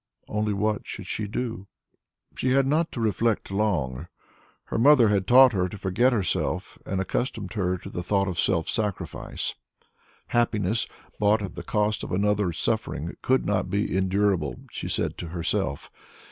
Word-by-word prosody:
Only 105 0 -1
what 105 +1 -1
should 100 - -6
she 105 +2 -3
do? 115 -2 -4 0.7
She 130 0 +1
had 135 0 +4
not 155 +4 +1
to - - -5
reflect 110 -1 0
long. 85 -9 -1 0.6
Her - - -3
mother 125 -3 +6
had 100 -3 +1
taught 130 +1 +8
her 90 -2 +1
to 105 - -8
forget 100 +7 +2
herself 105 -7 -1
and 95 - -1
accustomed 105 0 -2
her 95 -4 0
to - - -11
the 90 - -4
thought 100 +2 +1
of 90 -3 -3
self 85 -4 +1
sacrifice. 105 -3 -2 0.8
Happiness 110 -3 +1 0.3
bought 105 +1 +3
at 95 - -5
the - - -6
cost 105 0 0
of - - -6
another's 100 -2 +1
suffering 80 +5 -2
could 130 0 +2
not 105 - 0
be 100 -2 0
endurable, 95 -4 +1
she - - -5
said - - -1
to 85 - -5
herself. 85 -2 -2
105 Hz, 160 wpm, -26 LUFS, 95-110 Hz, 0.8 s, taught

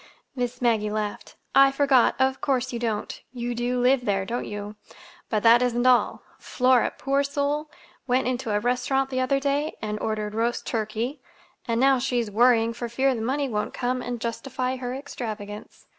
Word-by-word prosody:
Miss 250 -1 -3
Maggie 220 -3 +2
laughed. 210 -1 -4 0.2
"I 275 0 +7
forgot. 275 -3 +3
Of 265 0 +1
course 260 -2 0
you 235 - -3
don't. 225 -3 -3
You 240 -1 -3
do 245 +1 -1
live 250 +1 +3
there, 195 -2 0
don't 235 +4 -3
you? 205 0 -6 0.5
But 215 -2 0
that 235 +1 +7
isn't 245 0 +1
all. 255 -1 +3 0.2
Flora, 255 -1 +2
poor 275 +1 +1
soul, 285 +2 -1 0.4
went 250 0 +2
into 255 -2 -2
a 205 0 +1
restaurant 265 +3 0
the 255 - -1
other 275 +2 +1
day 285 +2 -1
and 210 0 -4
ordered 215 -1 -2
roast 230 +2 -1
turkey, 225 +4 -3 0.5
and 230 -1 0
now 270 0 +4
she's 245 -4 -1
worrying 230 +1 +4
for 235 0 -5
fear 265 +3 +2
the 230 - -4
money 275 +5 0
won't 210 -4 -3
come 250 0 -1
and 245 -1 -4
justify 255 +3 -3
her 250 0 -4
extravagance. 215 -7 -7
245 Hz, 175 wpm, -25 LUFS, 225-265 Hz, 0.5 s, I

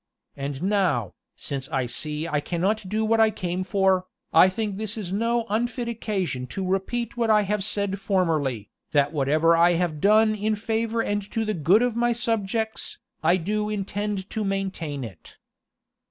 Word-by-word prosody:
And 140 +1 -4
now, 185 - +1 0.2
since 135 -2 -4
I 130 -2 0
see 150 +5 -3
I 150 -3 0
cannot 185 +6 -1
do 215 +2 0
what 225 +1 +2
I 220 0 +6
came 180 -3 -3
for, 190 -1 +2 0.3
I 185 - +7
think 205 0 -3
this 220 +1 -3
is 190 -4 -4
no 230 +2 +1
unfit 240 +3 -1
occasion 195 - -2
to 190 +9 -4
repeat 215 +6 -2
what 230 -2 +1
I 210 -1 +5
have 205 0 -1
said 200 -1 0
formerly, 155 - 0 0.2
that 145 +1 +3
whatever 155 +3 +3
I 170 +1 +5
have 165 -3 -1
done 215 +2 +5
in 215 +1 0
favor 225 +2 -1
and 205 0 -1
to 225 -1 -1
the 215 - -1
good 180 +7 +4
of 245 -2 0
my 240 0 +2
subjects, 220 -1 -2 0.2
I 170 +3 +4
do 210 +4 -1
intend 205 -1 -3
to 220 - -2
maintain 190 -8 -3
it." 95 -8 -11
195 Hz, 170 wpm, -25 LUFS, 165-220 Hz, 0.3 s, I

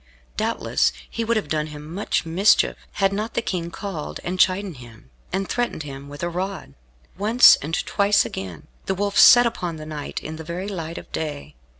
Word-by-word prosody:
Doubtless 65 - +1 0.2
he 230 - -3
would 230 0 +1
have 210 - -2
done 150 0 -1
him 150 +1 -9
much 195 -2 -1
mischief, 180 +6 +3 0.2
had 195 -1 +1
not 215 +3 -3
the - - +1
King 170 -5 -3
called 170 -3 -6
and 180 +1 -4
chidden 185 -3 +2
him, 115 - -14 0.2
and 195 0 -1
threatened 240 -10 -2
him 140 -1 -9
with 145 +2 -8
a - - +1
rod. 185 - -4 0.5
Once, 225 +5 +7
and 155 +3 -3
twice, 200 0 +3
again, 90 -5 -7 0.2
the 190 - 0
Wolf 200 +1 0
set 245 -1 +9
upon 180 -7 -2
the 155 -1 -8
knight 150 -2 -5
in 155 +1 -6
the 160 - -7
very 175 +4 -5
light 170 -4 -5
of - - -10
day. 150 -3 -5
175 Hz, 195 wpm, -23 LUFS, 150-200 Hz, 0.5 s, set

